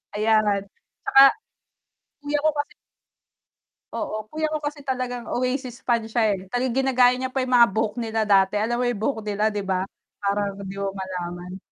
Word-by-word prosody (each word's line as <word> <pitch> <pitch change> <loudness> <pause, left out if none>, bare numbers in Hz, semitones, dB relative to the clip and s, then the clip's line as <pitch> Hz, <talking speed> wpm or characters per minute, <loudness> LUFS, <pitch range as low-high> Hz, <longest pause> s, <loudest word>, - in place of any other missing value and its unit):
Ayan. 215 -2 +2 0.4
Tsaka 270 0 +7 1.0
kuya 290 0 -1
ko 310 - +5
kasi 290 - -3 1.2
Oo, 215 0 -4
kuya 310 0 -1
ko 305 -1 -3
kasi 290 0 -4
talagang 250 -2 -3
Oasis 255 0 -2
fan 235 -2 +1
siya 220 -3 +1
eh, 185 0 -11
talagang 245 +3 -1
ginagaya 250 -1 +5
niya 260 0 -3
pa 265 -1 0
yung 255 - -4
mga 235 - +8
buhok 220 -1 0
nila 225 -1 -1
dati, 195 -1 +3
alam 235 +3 0
mo 250 - +1
yung 225 -4 -2
buhok 225 -1 0
nila 210 +1 0
'di 205 -1 -3
ba, 190 -1 0 0.4
parang 200 0 0
'di 195 -1 -7
mo 200 - -1
malaman. 180 -1 -6
225 Hz, 175 wpm, -24 LUFS, 200-255 Hz, 1.2 s, mga